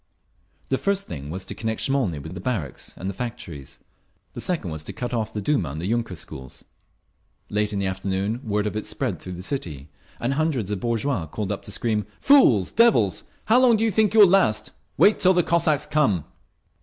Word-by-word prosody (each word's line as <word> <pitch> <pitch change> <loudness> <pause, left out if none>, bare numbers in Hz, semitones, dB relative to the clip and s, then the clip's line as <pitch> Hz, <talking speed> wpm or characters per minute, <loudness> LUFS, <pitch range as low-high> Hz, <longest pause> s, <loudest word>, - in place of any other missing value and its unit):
The 130 - +1
first 200 0 0
thing 70 -2 -7
was 95 +3 -5
to - - -6
connect 110 0 -3
Smolny 130 - +1
with 80 +4 -8
the 90 - -6
barracks 90 - -4
and 95 - -5
the 100 - -2
factories; 95 - -7 0.6
the - - -6
second, 110 - -2
to 75 - -7
cut 125 0 -4
off 110 -2 -1
the 105 - -4
Duma 100 - +1
and 75 +3 -6
the 85 - -4
yunker 115 -2 -1
schools…. 65 -3 -9 0.9
Late 105 0 0
in 100 - -2
the 100 - -1
afternoon 95 +4 -2
word 105 -3 -1
of 105 - -2
it 110 - -3
spread - - -2
through 90 - -8
the 90 +1 -6
city, 80 - -4 0.3
and 120 +3 0
hundreds 140 - 0
of 105 - -2
bourgeois 115 - -1
called 100 +5 -4
up 100 - -3
to - - -6
scream, 105 -2 0
"Fools! 130 - +5
Devils! 205 - +3 0.2
How 240 +3 +5
long 240 -3 +5
do 220 - 0
you 225 - +2
think 215 +1 +2
you 220 - +8
will 200 - +10
last? 110 - +2 0.3
Wait 210 - +5
till 185 0 +4
the 175 - +4
Cossacks 155 -3 +2
come!" 145 - +1
110 Hz, 205 wpm, -24 LUFS, 95-150 Hz, 0.9 s, will